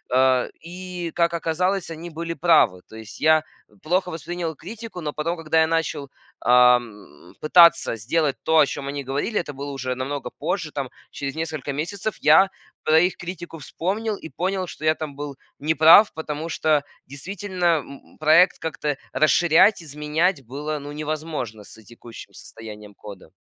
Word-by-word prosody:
Э, 130 -1 +3
и, 180 0 -7
как 170 0 +2
оказалось, 175 +3 -1
они 165 +2 -7
были 165 +1 -5
правы. 160 - +3
То 110 - -14
есть 110 -1 -11
я 155 0 +4 0.4
плохо 180 +2 0
воспринял 165 +1 -5
критику, 215 +2 -9
но 150 - -3
потом, 165 +4 -2
когда 160 0 +1
я 160 - +3
начал, 160 -4 -2 0.3
ам, 120 -10 +2
пытаться 170 -6 +5
сделать 140 +6 0
то, 160 0 +3
о 145 - +7
чем 140 0 -6
они 140 0 -4
говорили, 140 - -2
это 150 - -5
было 140 +1 -7
уже 130 -2 -3
намного 135 +2 -4
позже, - - -3
там - - -4 0.2
через 140 +1 -5
несколько 155 -3 -4
месяцев, 195 +8 -4
я 160 +6 +6 0.3
про 155 +1 +5
их 180 +2 +1
критику 175 -2 -8
вспомнил 205 +8 -3
и 160 - -10
понял, 185 0 -2
что 155 - -8
я 155 - +5
там 155 -3 -7
был 145 -1 -6 0.2
неправ, 160 +7 +6
потому 160 +1 -5
что 155 -1 +1 0.2
действительно, 180 +6 -5
м 160 -6 +1 0.2
м - - -22
проект 160 +4 +5
как-то 150 -3 -3 0.2
расширять, 170 +5 +4
изменять 150 +2 -1
было, 150 +5 -4
ну, 145 0 -8
невозможно 150 -7 -5
с 110 - -15
текущим 115 +1 -13
состоянием 105 -2 -11
кода. 100 -5 -12
155 Hz, 160 wpm, -23 LUFS, 140-170 Hz, 0.4 s, о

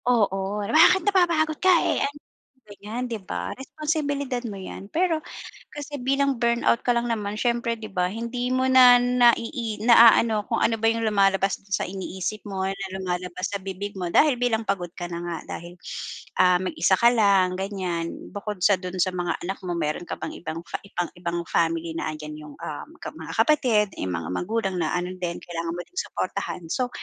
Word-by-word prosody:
Oo, 205 -3 +1
"Bakit 320 - +5
napapagod 340 -6 +2
ka, 375 - +4 0.2
eh - - +1
ano," 285 +1 -2 0.5
ganyan, 210 +4 -6
'di 230 -3 -4
ba, 185 - -4
responsibilidad 285 -2 -2
mo 200 -2 -6
yan. 195 +1 -8
Pero 335 -1 +1 0.5
kasi 290 0 -6
bilang 275 +1 +1
burnout 235 0 +2
ka 245 - +4
lang 235 0 0
naman, 210 -3 -2
siyempre, 235 -1 0
'di 215 -1 -7
ba, 180 -3 0
hindi 235 +3 -3
mo 260 0 +2
na 250 -1 +8
naii 240 -2 +2
naaano 230 -2 +6
kung - - -1
ano 225 - +3
ba 225 - -2
yung 230 0 -2
lumalabas 195 -2 +2
dun 195 0 -8
sa - - 0
iniisip 190 +2 -4
mo 190 -2 -2
na 195 0 -4
lumalabas 180 -1 -3
sa 200 - -2
bibig 195 +1 -6
mo 175 -2 -3
dahil 295 -4 +5
bilang 240 -2 +1
pagod 175 -3 -1
ka 175 - -5
na 170 - -4
nga. 170 -1 -3 0.2
Dahil 170 +1 -11 0.7
ah, 180 -1 +5
mag-isa 185 -1 +1
ka 235 - +6
lang 195 -5 +3
ganyan. 185 -4 -3 0.2
Bukod 205 -1 -5
sa 200 +1 +6
dun 185 0 -6
sa 185 - +3
mga 175 -2 -1
anak 190 +3 -3
mo 175 - -2
meron 160 +1 -2
ka - - -5
pang - - -4
ibang 165 -1 -6 0.6
ibang 175 0 -3
family 165 0 0
na 155 - -2
andyan 150 0 -8
yung, 150 -1 -11
um, 150 - -6
ka - - -5
mga - - -8
kapatid, 245 -9 +3
yung 95 -1 -3
mga 85 -1 -4
magulang 195 - -1
na 160 -2 0
ano 180 +1 -2
din, 175 -1 -3
kailangan 170 -1 -4
mo 175 - -4
ding 360 - -24
suportahan. - - -3
So, 250 -1 0
205 Hz, 185 wpm, -25 LUFS, 180-245 Hz, 0.7 s, na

